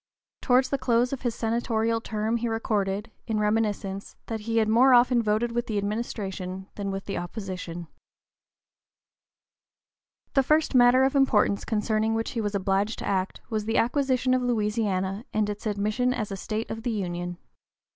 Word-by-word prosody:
Towards 255 0 +3
the 275 - 0
close 245 +1 +2
of 270 - -4
his 240 -3 -1
senatorial 230 0 0
term 220 +1 -1
he 235 +1 -2
recorded, 210 -2 -1 0.2
in 220 -2 0
reminiscence, 210 -2 -1
that 225 -1 -4
he 225 +2 -2
had 220 -1 +3
more 250 +4 +6
often 245 0 +5
voted 220 +2 0
with 240 +1 -2
the 215 - -2
administration 195 -3 -3
than 200 -1 -4
with 195 0 -4
the 200 - -3
opposition. 180 -3 -6 2.5
The 275 - +5
first 305 +3 +2
matter 250 +1 +6
of 270 +1 +2
importance 235 -7 +3
concerning 220 0 0
which 225 0 -2
he 230 - -2
was 205 -1 -2
obliged 195 +2 0
to - - -5
act 190 -1 -1
was 215 -1 -1
the 225 +1 0
acquisition 255 0 +2
of 255 - +2
Louisiana 210 -4 0
and 215 -1 +1
its 210 +2 -6
admission 215 +5 0
as 210 -2 -3
a - - -2
state 215 +3 -4
of 225 - -5
the 240 - -2
Union. 175 -4 -3
220 Hz, 165 wpm, -26 LUFS, 200-240 Hz, 2.5 s, more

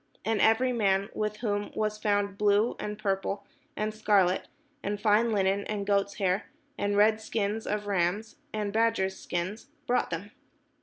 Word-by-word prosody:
And 220 -1 +1
every 250 +3 +4
man, 200 -3 +1
with 210 0 -2
whom 205 -3 -1
was 215 0 -1
found 205 -2 +1
blue, 205 +2 +3
and 210 0 -4
purple, 200 -1 -2 0.3
and 215 0 -1
scarlet, 200 -4 +2 0.3
and 205 +1 -2
fine 220 +2 +3
linen, 200 -1 +1
and 205 -2 -3
goats' 200 0 +1
hair, 190 -1 0 0.3
and 205 -4 0
red 215 +1 +4
skins 220 0 -2
of 210 0 -1
rams, 200 +2 -1
and 210 -2 -2
badgers' 220 -4 +1
skins, 180 +6 -4 0.2
brought 250 +1 +1
them. 185 +5 -5
205 Hz, 155 wpm, -29 LUFS, 200-215 Hz, 0.3 s, every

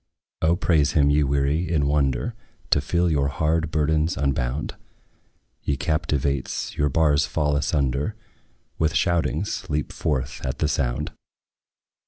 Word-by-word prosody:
O 80 +2 +3
praise 80 -4 +2
him, 70 -2 +4
ye 75 +1 +3
weary, 70 +5 0
in 75 -4 +2
wonder 70 - +1 0.4
To - - +4
feel 90 0 +1
your 70 -2 +2
hard 80 +3 0
burdens 80 +1 +1
unbound! 70 0 -1 0.9
Ye 70 - -1
captives, 70 -4 -1
your 75 0 +1
bars 75 -1 +3
fall 75 -2 0
asunder; 70 - 0 0.6
With 80 -2 +1
shoutings 85 +2 0
leap 75 -1 -2
forth 70 -2 -2
at 65 - -2
the - - +1
sound. - - -1
75 Hz, 130 wpm, -24 LUFS, 70-80 Hz, 0.9 s, him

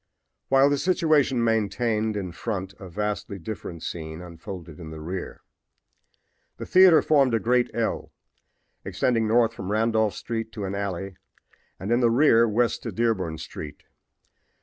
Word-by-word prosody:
While 135 +1 +5
this 145 - 0
situation 155 -9 +2
maintained 110 0 0
in 95 -3 -4
front 95 0 -4
a 95 - -9
vastly 105 +1 -3
different 85 -3 -7
scene 80 -1 -6
unfolded 85 -1 -9
in 80 -2 -8
the 80 0 -8
rear. 90 +4 -6 1.2
The - - -6
theater 185 -4 +6
formed 135 -6 +3
a - - +2
great 125 +2 +2
L, 115 -1 -2 0.7
extending 115 -3 0
north 115 +1 +3
from 100 -3 -6
Randolph 110 -1 +1
street 115 -1 -4
to 105 - -4
an 95 - -4
alley 95 -1 -4 0.6
and, 95 +5 -4
in 120 - +4
the 120 -2 +4
rear, 115 -2 +5
west 115 +3 +1
to 115 - -5
Dearborn 95 -7 -1
street. 75 -1 -8
110 Hz, 150 wpm, -25 LUFS, 95-120 Hz, 1.2 s, theater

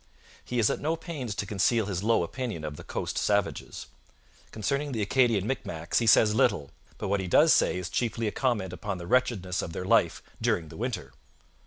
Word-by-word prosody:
He 125 - -4
is 115 -3 +3
at - - -2
no 160 +3 0
pains 150 - -5
to 100 - -2
conceal 105 +3 +1
his 95 -3 -3
low 110 -3 +2
opinion 115 - -4
of 75 -1 -5
the - - -10
coast - - -3
savages. 100 -1 -1 0.6
Concerning 140 +6 -2
the 110 - -1
Acadian 115 -3 +2
Micmacs 85 -10 -2
he 115 - -1
says 105 0 +6
little, 100 - +1 0.3
but - - -4
what 100 +1 +1
he 95 - -3
does 155 - +6
say - - +3
is 90 -1 -4
chiefly 115 +2 -1
a 105 - 0
comment 105 -9 -1
upon 100 +1 -4
the 85 - -7
wretchedness 105 -5 +1
of 85 - -6
their 90 - -4
life - - +2 0.2
during 80 -2 0
the - - -11
winter. - - -4
105 Hz, 200 wpm, -28 LUFS, 90-125 Hz, 0.6 s, says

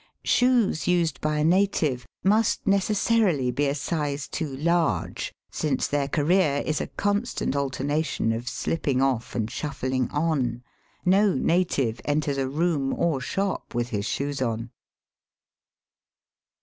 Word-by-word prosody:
Shoes 245 -9 +3
used 175 -2 +1
by 155 0 0
a 150 - +1
native 160 - +2 0.2
must 210 +3 +2
necessarily 200 - +2
be 145 +3 0
a 140 - 0
size 145 -1 -2
too 150 -6 -4
large, 170 +2 0 0.2
since 145 -4 0
their 145 -1 0
career 150 0 +2
is 155 - -1
a - - -3
constant 205 - -1
alternation 140 -1 -1
of 115 +2 -4
slipping 130 +1 -1
off 130 -3 0
and 110 -3 0
shuffling 130 -4 -2
on. 140 -6 -1 0.4
No 195 +2 +4
native 155 -10 +1
enters 145 -1 0
a 135 -1 -1
room 150 -2 0
or 155 -6 0
shop 190 0 -3
with 120 0 -1
his 105 -3 -2
shoes 140 -1 -2
on. 115 -1 -2
145 Hz, 130 wpm, -25 LUFS, 130-175 Hz, 0.4 s, No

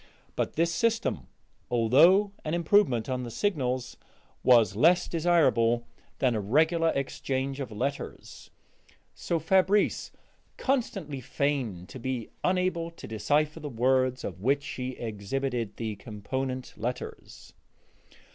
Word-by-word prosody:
But - - -1
this 165 +1 +1
system, 225 - 0 0.4
although 155 - +5
an 155 +2 -1
improvement 170 - +3
on 130 -1 -2
the 120 - -5
signals, 130 - -1 0.4
was 115 -6 +5
less 170 - +4
desirable 140 -9 +2 0.3
than 130 -2 +2
a 110 - -1
regular 160 - +3
exchange 135 0 -2
of 130 -5 -5
letters, 140 +7 -5 0.6
so 170 - -2
Fabrice 190 +5 +2 0.5
constantly 195 - -1
feigned 120 -10 -2
to 130 - -9
be 125 -2 -4
unable 180 -2 +1
to 165 - -12
decipher 150 +8 0
the 150 -2 -6
words 130 +1 +1
of 90 - -6
which 140 +5 +2
she 130 -2 -4
exhibited 120 +1 -3
the 110 -3 -4
component 130 +5 -4
letters. 125 +3 -6
135 Hz, 120 wpm, -28 LUFS, 120-165 Hz, 0.6 s, although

